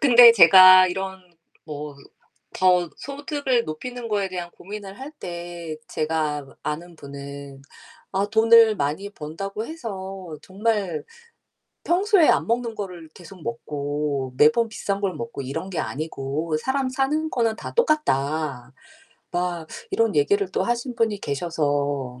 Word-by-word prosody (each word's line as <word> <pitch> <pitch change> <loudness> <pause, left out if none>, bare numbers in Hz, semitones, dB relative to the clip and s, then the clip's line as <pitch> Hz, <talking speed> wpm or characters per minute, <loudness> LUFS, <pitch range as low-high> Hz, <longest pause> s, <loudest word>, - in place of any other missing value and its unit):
근데 245 -3 +9
제가 185 -1 +9
이런 190 +1 -5 0.4
뭐 150 -2 -7 0.6
더 180 -2 +3
소득을 280 -3 -2
높이는 240 +10 -6
거에 205 -2 0
대한 175 -2 -6
고민을 200 +1 -9
할 270 +3 -7
때에 175 - -7
제가 155 -2 -1
뭐 135 - -17
아는 170 +3 -5
분은 140 -1 -9 0.5
"아 195 +1 +1
돈을 225 0 +6
많이 155 +8 -2
번다고 195 +6 -6
해서 195 - -7
정말 200 -4 -2 0.8
평소에 375 -1 +4
안 - - +3
먹는 235 -1 0
거를 180 -6 -7
계속 175 0 -13
먹고 140 +1 -3
매번 155 - +4
비싼 200 -2 -3
걸 195 -3 -1
먹고 230 -11 -6
이런 160 +8 -5
게 180 - -4
아니고 155 +1 -3
사람 265 - -1
사는 295 +4 0
거는 230 -3 +1
다 - - -7
똑같다." 150 - 0 0.6
막 175 -2 -2 0.2
이런 225 -5 +1
얘기를 200 +7 +2
또 - - 0
하신 240 +1 -2
분이 220 -4 0
계셔서 145 -4 -2
185 Hz, 250 characters per minute, -23 LUFS, 150-230 Hz, 0.8 s, 근데